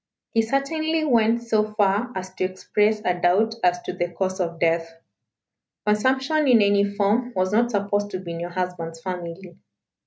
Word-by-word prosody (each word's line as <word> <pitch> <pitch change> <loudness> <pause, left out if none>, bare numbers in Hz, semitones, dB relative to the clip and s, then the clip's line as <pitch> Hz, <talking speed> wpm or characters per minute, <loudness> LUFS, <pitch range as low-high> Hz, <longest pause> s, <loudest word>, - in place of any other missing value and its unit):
He 225 - +4
certainly 310 +6 0
went 235 -3 +3
so 215 -2 0
far 205 +3 +1
as 185 0 -6
to 185 - -3
express 210 +3 0
a 180 - +3
doubt 205 +6 +3
as 180 0 +2
to - - -4
the 175 -1 -2
cause 185 +2 -3
of 170 -2 -2
death. 165 0 +1 0.9
Consumption 265 +8 +2
in 245 -3 +6
any 200 0 +3
form 205 +5 0
was 185 +1 0
not 235 +2 +3
supposed 205 -1 -1
to 185 - -4
be 175 -2 -7
in 170 - -5
your 175 +1 -4
husband's 175 -2 -4
family. 175 0 -7
200 Hz, 175 wpm, -23 LUFS, 180-225 Hz, 0.9 s, in